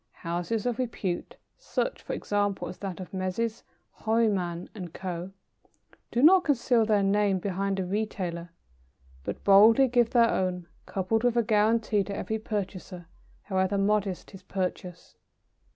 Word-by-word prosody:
Houses 175 +6 -2
of 245 0 -1
repute 205 -8 -3 0.2
such, - - -2
for - - -5
example, 205 -1 -1
as 180 - -9
that 195 -3 -5
of 185 - -9
Messrs. 190 +5 -2 0.4
Horniman 200 -6 0
and 180 -6 -7
Co. 180 0 -5 0.8
do 245 - 0
not 365 +4 +7
conceal 245 -6 +2
their 210 -2 +3
names 195 -1 +2
behind 195 0 -1
a 185 - -1
retailer, 180 -4 -3 0.7
but - - -5
boldly 220 +7 +7
give 240 -2 +3
their 235 -2 +4
own, 180 -1 -1 0.2
coupled 210 +4 -1
with 245 -1 +2
a 235 - +4
guarantee 215 -1 +2
to 200 - -5
every 220 +2 -3
purchaser, 190 -4 -5 0.4
however 190 0 0
modest 200 -2 0
his 195 - -12
purchase. 180 -2 -5
200 Hz, 140 wpm, -27 LUFS, 185-225 Hz, 0.8 s, not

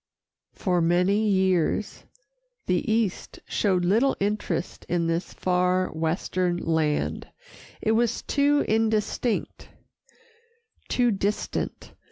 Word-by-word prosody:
For 180 -2 0
many 180 +6 +2
years, 190 0 +1 0.6
the 180 +4 0
East 220 -4 -1
showed 185 -4 +1
little 230 +9 +2
interest 205 -3 -2
in 170 -1 +1
this 165 +1 -1
far 180 0 +1
western 175 +2 -1
land 160 -3 -1 0.5
it 220 - +1
was 230 +1 +1
too 290 0 +2
indistinct, 220 +1 -1 1.2
too 245 -1 +2
distant. 200 +1 -3
190 Hz, 95 wpm, -25 LUFS, 175-220 Hz, 1.2 s, many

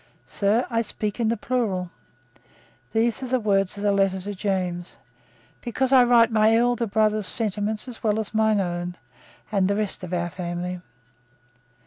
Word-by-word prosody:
"Sir, 215 +5 +1
I 230 0 +2
speak 210 -1 -4
in 230 - +1
the 230 +1 +1
plural," 205 -7 -1 1.0
these 225 +2 +1
are 260 - -4
the 255 +1 +1
words 195 -2 +1
of 200 - -5
the 205 - +3
letter 195 -1 +2
to 205 +2 -5
James, 185 -3 -3 0.6
"because 255 +3 -1
I 255 -2 +8
write 240 -1 +5
my 220 0 +4
elder 240 0 +1
brother's 215 -1 +1
sentiments 210 +3 -1
as 245 -3 -7
well 215 -1 +1
as 220 0 -4
my 220 0 +3
own, 175 -1 -3 0.6
and 195 -3 +2
the 200 - +1
rest 210 -3 -2
of 180 - -6
our 175 -1 -1
family." 180 0 -4
210 Hz, 165 wpm, -24 LUFS, 185-230 Hz, 1.0 s, I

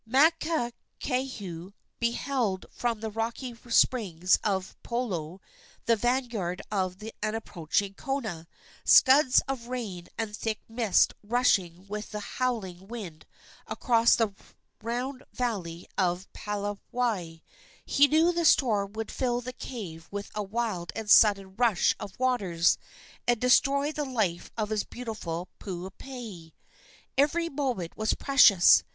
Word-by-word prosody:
Makakehau 255 - 0 0.3
beheld 235 -4 -1
from 235 -3 -2
the 220 -1 -3
rocky 230 +3 -3
springs 190 -8 +3
of 190 -2 -1
Pulou 190 -9 -3 0.5
the 230 - +4
vanguard 225 -6 -1
of 185 -3 -1 0.2
an 215 +1 -1
approaching 195 -2 -2
kona 220 -10 -4 0.4
scuds 265 -1 +6
of 260 -3 -4
rain 215 -9 -5
and 220 -2 -3
thick 220 0 -2
mist 225 -3 +3
rushing 195 -6 +1
with 210 +1 -6
a - - -2
howling 200 -6 -3
wind 195 -9 -8 0.4
across 235 -2 +3
the 220 -3 0 0.5
round 250 +4 -3
valley 185 -9 -3
of 180 0 0
Palawai. 205 -3 -3 0.4
He 285 +1 +5
knew 320 +4 +4
the 340 0 0
storm 215 -10 +3
would 220 0 -4
fill 245 -2 0
the 250 +1 -6
cave 180 -11 -7
with 205 0 -6
a 210 - -2
wild 205 -4 -2
and 220 -2 -2
sudden 195 -3 +6
rush 230 -7 +3
of 195 - -8
waters, 195 -10 +2 0.5
and 240 -2 +3
destroy 275 +4 +3
the 300 -1 -3
life 215 -10 -1
of 215 -1 -2
his 215 -1 0
beautiful 200 -8 -5
Puupehe. 190 -1 -8 0.7
Every 335 +4 +2
moment 255 - -2
was 215 0 0
precious. 225 -10 +6
220 Hz, 120 wpm, -28 LUFS, 190-250 Hz, 0.7 s, scuds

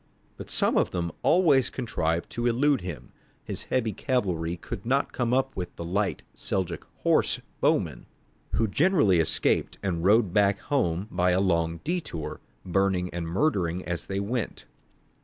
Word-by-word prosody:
But - - -9
some - - +2
of - - +1
them 85 -2 -2
always 155 -8 +4
contrived 85 -9 -2
to 120 +1 -1
elude 135 +2 +2
him; 90 -4 -7 0.3
his - - -5
heavy 115 -4 -1
cavalry 90 - -1
could 100 +3 -7
not 135 +4 0
come 120 -2 0
up 135 +1 +1
with 90 -2 -5
the 85 - -6
light 95 +3 -1
Seljouk 95 -3 -3 0.2
horse - - +3 0.2
bowmen, - - +1 0.5
who 110 +4 +2
generally 140 - +3
escaped 80 - +1
and 85 -4 -1
rode 105 -1 +4
back 100 -1 +4
home 95 - -1
by 90 0 +2
a 90 +1 +3
long 85 -3 +1
detour, 155 - -4 0.2
burning 95 -1 +1
and 85 -1 -3
murdering 90 - 0
as 85 -1 -4
they 95 0 -2
went. 110 +3 -3
95 Hz, 155 wpm, -27 LUFS, 85-125 Hz, 0.5 s, always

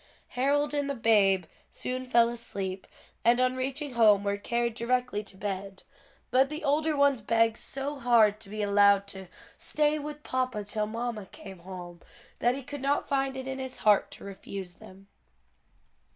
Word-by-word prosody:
Harold 285 +3 +1
and 285 -1 -1
the 280 - -2
babe 200 -6 +3 0.2
soon 255 0 -5
fell 235 -1 +5
asleep, 195 -5 -5 0.4
and 235 +2 +4
on 255 0 +2
reaching 270 +2 -3
home 215 -4 +5
were 200 0 0
carried 235 +3 -1
directly 240 -2 -1
to 195 -2 -11
bed; 195 -1 -5 0.5
but 265 +2 +4
the 305 +2 -6
older 305 +1 +1
ones 280 -4 +3
begged 225 +1 +2
so 275 +1 -5
hard 225 -4 +4
to 210 -3 -14
be 215 +1 -3
allowed 200 -1 +4
to 190 -1 -9 0.3
"stay 300 0 0
with 300 0 -7
papa 255 -5 -2
till 210 +1 -2
mamma 225 -2 -4
came 190 -1 -11
home" 175 -1 -9 0.4
that 245 +1 +2
he 275 - -6
could 285 +1 -7
not 280 +1 0
find 270 -1 0
it 260 - -5
in 265 0 -4
his 260 -1 -5
heart 210 -2 +5
to - - -12
refuse 195 -2 -7
them. 195 +2 -15
235 Hz, 170 wpm, -28 LUFS, 200-265 Hz, 0.5 s, fell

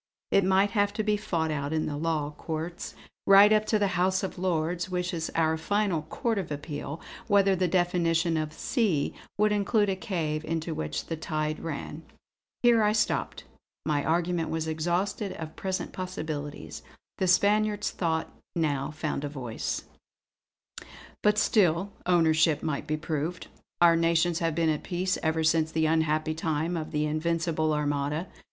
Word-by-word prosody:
It 195 - +4
might 190 +2 +3
have 205 -2 +1
to 215 - -1
be 210 0 +2
fought 170 -7 -1
out 140 -1 -2
in 160 0 0
the 145 - -3
Law 150 -1 -1
Courts, 165 +3 -5 0.3
right 200 +2 +8
up 215 0 +3
to 215 - +3
the 205 -2 +1
House 185 +1 +1
of 190 - -4
Lords 175 0 -1
which 180 -1 -2
is 160 -1 -2
our 160 -1 +2
final 200 0 0
Court 225 - -2
of 175 -5 -5
Appeal, 145 +1 -5 0.3
whether 200 -1 +4
the 185 0 +1
definition 170 -1 +1
of 155 -1 -1
'sea' 185 - 0 0.2
would 210 +1 +3
include 205 0 +2
a 190 - 0
cave 165 -4 -2
into 165 +1 -2
which 75 - -3
the 165 - -3
tide 155 -1 -2
ran." 155 0 -5 0.6
Here 235 -2 +5
I 210 0 +3
stopped; 220 - 0 0.4
my 145 -2 +1
argument 170 0 0
was 160 0 -2
exhausted 175 +6 -1
of 160 -1 -7
present 190 -1 -3
possibilities. 155 -6 -5 0.4
The 190 - +1
Spaniard's 210 +3 +3
thought 160 -2 -2 0.2
now 145 -5 0
found 150 -1 -3
a 145 - -2
voice: 125 -6 -4 1.4
"But 210 0 +3
still 195 -3 +3 0.2
ownership 160 -3 +3
might 150 -2 -2
be 155 0 0
proved. 155 +2 -3 0.3
Our 170 -1 +6
nations 165 0 +2
have 165 -2 0
been 165 -1 +2
at 155 -1 0
peace 185 +1 -1
ever 160 0 0
since 160 0 +2
that 160 0 +1
unhappy 155 0 +1
time 160 +1 -1
of 160 -2 -3
the 150 -1 0
Invincible 160 0 0
Armada. 150 +2 -1
165 Hz, 160 wpm, -28 LUFS, 155-185 Hz, 1.4 s, right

